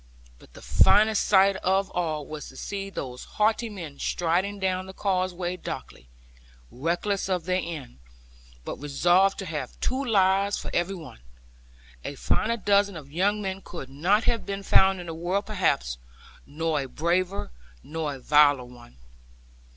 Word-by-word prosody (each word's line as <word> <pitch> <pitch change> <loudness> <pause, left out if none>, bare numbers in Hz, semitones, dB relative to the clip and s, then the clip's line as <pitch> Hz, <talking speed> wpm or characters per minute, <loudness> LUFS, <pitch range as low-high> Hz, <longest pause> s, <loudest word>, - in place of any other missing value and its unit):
But - - -19
the - - -12
finest 215 +1 +4
sight 195 -1 +5
of 190 +1 +1
all 155 -4 -2
was 155 0 -7
to 130 - -14
see 195 -1 -4
those 125 -9 -6
haughty 220 +2 +2
men 165 -9 -8
striding 180 +4 0
down 185 -1 -1
the 190 - -10
causeway 185 -2 -1
darkly, 65 - -8 0.6
reckless 175 +9 -1
of 180 -3 -1
their 185 0 +1
end, 150 - -7 0.7
but - - -5
resolute 175 +7 +3
to 195 - -5
have 150 -7 -5
two 260 +2 -1
lives 200 -3 +3
for - - -6
every 175 +3 0
one. 155 - -11 0.8
A - - -5
finer 230 +2 0
dozen 200 -3 +2
of 140 -3 -11
young 205 +6 +1
men 190 0 -3
could 135 -9 -8
not 185 +10 +2
have 230 0 0
been 200 0 -5
found 190 -1 +4
in 175 - -7
the 165 - -5
world 180 +5 -1
perhaps, 65 - 0 0.5
nor 155 0 -1
a 135 - -5
braver, 175 - -1 0.3
nor 155 -2 -3
a - - -10
viler 145 -1 +4
one. 120 - -15
180 Hz, 160 wpm, -26 LUFS, 150-195 Hz, 0.8 s, sight